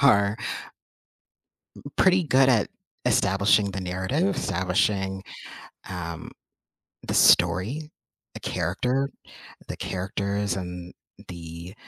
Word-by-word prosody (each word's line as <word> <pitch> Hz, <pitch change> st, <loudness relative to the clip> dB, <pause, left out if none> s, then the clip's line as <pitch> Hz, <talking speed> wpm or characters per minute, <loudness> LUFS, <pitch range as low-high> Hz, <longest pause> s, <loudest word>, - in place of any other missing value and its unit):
are 100 Hz, -5 st, +5 dB, 1.4 s
m -, -, -13 dB
pretty 185 Hz, -1 st, +5 dB
good 135 Hz, -3 st, +4 dB
at 115 Hz, -5 st, +3 dB, 0.4 s
establishing 100 Hz, +1 st, +3 dB
the 95 Hz, -, -4 dB
narrative, 95 Hz, -, 0 dB
establishing, 95 Hz, +1 st, 0 dB, 0.7 s
um, 85 Hz, -3 st, -5 dB, 0.8 s
the -, -, -1 dB
story, 100 Hz, -, +4 dB, 0.4 s
the -, -, -7 dB
character 125 Hz, +10 st, -1 dB, 0.6 s
the -, -, -5 dB
characters 100 Hz, +1 st, -2 dB
and 90 Hz, -1 st, -6 dB, 0.4 s
the 85 Hz, +1 st, -8 dB
95 Hz, 90 wpm, -26 LUFS, 90-125 Hz, 1.4 s, are